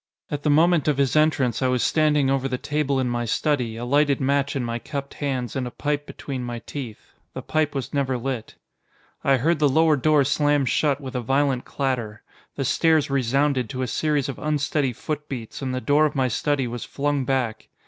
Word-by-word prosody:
At 145 Hz, -, -2 dB
the 150 Hz, -, 0 dB
moment 160 Hz, +1 st, +4 dB
of 150 Hz, -3 st, +2 dB
his 140 Hz, -1 st, +1 dB
entrance 150 Hz, -6 st, +2 dB
I 130 Hz, -, +2 dB
was 125 Hz, -1 st, +1 dB
standing 150 Hz, -3 st, +3 dB
over 135 Hz, -1 st, +1 dB
the 130 Hz, -1 st, -2 dB
table 145 Hz, -1 st, -1 dB
in 130 Hz, -, 0 dB
my 120 Hz, 0 st, -1 dB
study, 125 Hz, -1 st, 0 dB
a 120 Hz, -, -4 dB
lighted 145 Hz, +2 st, +2 dB
match 140 Hz, +1 st, +1 dB
in 135 Hz, -, -1 dB
my 115 Hz, 0 st, -3 dB
cupped 140 Hz, +3 st, -6 dB
hands 130 Hz, -5 st, -3 dB
and 130 Hz, -2 st, -2 dB
a -, -, -4 dB
pipe 145 Hz, +3 st, -3 dB
between 130 Hz, -3 st, -6 dB
my 120 Hz, -1 st, -4 dB
teeth. 125 Hz, -7 st, -8 dB, 0.2 s
The -, -, -5 dB
pipe 155 Hz, -2 st, 0 dB
was 135 Hz, -, -4 dB
never 135 Hz, -3 st, 0 dB
lit. 120 Hz, -2 st, -4 dB, 0.7 s
I 135 Hz, -1 st, +4 dB
heard 155 Hz, +5 st, +1 dB
the 150 Hz, -2 st, +4 dB
lower 160 Hz, +2 st, +4 dB
door 150 Hz, +1 st, +3 dB
slam 145 Hz, 0 st, +2 dB
shut 140 Hz, +2 st, +1 dB
with 135 Hz, -3 st, -7 dB
a 125 Hz, -, -2 dB
violent 135 Hz, +1 st, +1 dB
clatter. 120 Hz, -6 st, -3 dB, 0.3 s
The 135 Hz, -, -2 dB
stairs 160 Hz, 0 st, +2 dB
resounded 135 Hz, -1 st, +1 dB
to 130 Hz, +3 st, -3 dB
a -, -, -2 dB
series 150 Hz, +2 st, 0 dB
of 135 Hz, -, -6 dB
unsteady 145 Hz, -2 st, 0 dB
footbeats, 140 Hz, -2 st, -6 dB
and 130 Hz, -1 st, -2 dB
the 130 Hz, -, -2 dB
door 145 Hz, +3 st, +3 dB
of -, -, -7 dB
my 130 Hz, -2 st, +1 dB
study 140 Hz, +3 st, 0 dB
was 120 Hz, 0 st, -5 dB
flung 145 Hz, -1 st, -1 dB
back. 125 Hz, -4 st, -1 dB
135 Hz, 210 wpm, -24 LUFS, 125-145 Hz, 0.7 s, moment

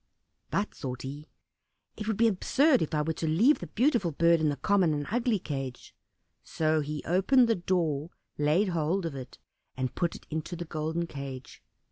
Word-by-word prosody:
"But," 205 Hz, +2 st, -1 dB
thought 125 Hz, -3 st, -6 dB
he, 145 Hz, +3 st, -7 dB, 0.7 s
"it 215 Hz, -, -6 dB
would 220 Hz, -3 st, 0 dB
be 230 Hz, -, +4 dB
absurd 260 Hz, -, +3 dB
if 160 Hz, -, -1 dB
I 150 Hz, -, +1 dB
were 160 Hz, +1 st, -1 dB
to 160 Hz, -, -3 dB
leave 220 Hz, -, +4 dB
the 175 Hz, -, -6 dB
beautiful 235 Hz, -, +2 dB
bird 170 Hz, +2 st, +3 dB
in 155 Hz, -, +3 dB
the 145 Hz, -, -1 dB
common 175 Hz, +2 st, +2 dB
and 145 Hz, 0 st, -3 dB
ugly 235 Hz, -1 st, +1 dB
cage," 135 Hz, -7 st, -6 dB, 0.5 s
so 155 Hz, 0 st, +1 dB
he 150 Hz, 0 st, -4 dB
opened 235 Hz, +9 st, +4 dB
the 230 Hz, -, +3 dB
door, 170 Hz, -5 st, -1 dB, 0.3 s
laid 155 Hz, +7 st, +2 dB
hold 170 Hz, +2 st, 0 dB
of 165 Hz, -, -3 dB
it, 130 Hz, -2 st, -8 dB, 0.4 s
and 130 Hz, -1 st, -2 dB
put 170 Hz, -2 st, -1 dB
it -, -, -12 dB
into 160 Hz, +3 st, -3 dB
the 175 Hz, 0 st, -5 dB
golden 160 Hz, +2 st, -2 dB
cage. 140 Hz, -4 st, -8 dB
165 Hz, 185 wpm, -29 LUFS, 150-195 Hz, 0.7 s, be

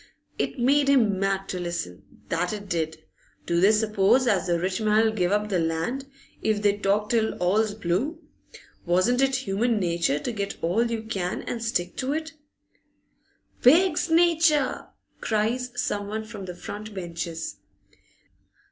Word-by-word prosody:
It -, -, -2 dB
made 275 Hz, +3 st, +3 dB
him 225 Hz, -8 st, +3 dB
mad 195 Hz, 0 st, 0 dB
to 185 Hz, -, -3 dB
listen, 165 Hz, -, -6 dB
that 175 Hz, +4 st, -1 dB
it 205 Hz, -1 st, -6 dB
did! 160 Hz, -2 st, -3 dB, 0.4 s
Do 170 Hz, 0 st, +1 dB
they 200 Hz, +3 st, +6 dB
suppose 215 Hz, +3 st, +3 dB
as 195 Hz, -7 st, +1 dB
the 170 Hz, -1 st, +1 dB
rich 185 Hz, +3 st, -2 dB
man 215 Hz, +1 st, +3 dB
'll -, -, +1 dB
give 180 Hz, -4 st, 0 dB
up 210 Hz, +1 st, +1 dB
the 185 Hz, -3 st, +1 dB
land, 165 Hz, +12 st, -2 dB, 0.3 s
if 215 Hz, -1 st, 0 dB
they 205 Hz, -1 st, +3 dB
talk 205 Hz, +1 st, +1 dB
till 225 Hz, -2 st, +1 dB
all's 205 Hz, +4 st, +1 dB
blue? 220 Hz, -, -1 dB, 0.7 s
Wasn't 185 Hz, +9 st, +2 dB
it 270 Hz, 0 st, +2 dB
human 215 Hz, +3 st, +1 dB
natur 170 Hz, -5 st, +1 dB
to 245 Hz, -, -3 dB
get 200 Hz, -3 st, -4 dB
all 220 Hz, +8 st, +1 dB
you 225 Hz, -1 st, -3 dB
can 190 Hz, -5 st, -3 dB
and 230 Hz, -1 st, -4 dB
stick 180 Hz, -6 st, -1 dB
to 265 Hz, +2 st, -1 dB
it? 315 Hz, +1 st, -4 dB, 1.3 s
'Pig's 345 Hz, +6 st, +4 dB
nature!' 325 Hz, -4 st, +3 dB, 0.3 s
cries 235 Hz, +4 st, -1 dB
someone 205 Hz, +1 st, -2 dB
from 215 Hz, -3 st, -8 dB
the 180 Hz, -1 st, -7 dB
front 210 Hz, +3 st, -8 dB
benches. 170 Hz, -2 st, -5 dB
210 Hz, 155 wpm, -25 LUFS, 180-235 Hz, 1.3 s, they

